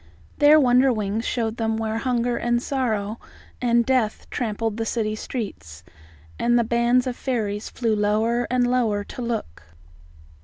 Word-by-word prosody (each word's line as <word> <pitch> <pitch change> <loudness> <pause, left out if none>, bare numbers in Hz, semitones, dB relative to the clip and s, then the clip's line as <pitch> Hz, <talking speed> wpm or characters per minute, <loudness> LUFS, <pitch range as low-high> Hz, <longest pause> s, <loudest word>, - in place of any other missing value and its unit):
There 295 +1 +7
Wonderwings 245 -5 +2
showed 225 -2 -1
them 225 -1 -1
where 220 0 -2
hunger 245 -1 0
and 240 0 0
sorrow 230 -5 -2 0.4
and 235 -1 +3
death 250 -4 0
trampled 225 -2 -2
the 225 - -1
city 215 -2 -1
streets, 90 - -6 0.6
and 240 0 +3
the 235 - +3
band 235 +2 +2
of 255 -2 -3
fairies 215 -6 -2
flew 225 -3 -1
lower 220 +3 +1
and 250 0 +2
lower 235 -5 +1
to 245 - -8
look. 230 - -4
235 Hz, 145 wpm, -23 LUFS, 215-245 Hz, 0.6 s, There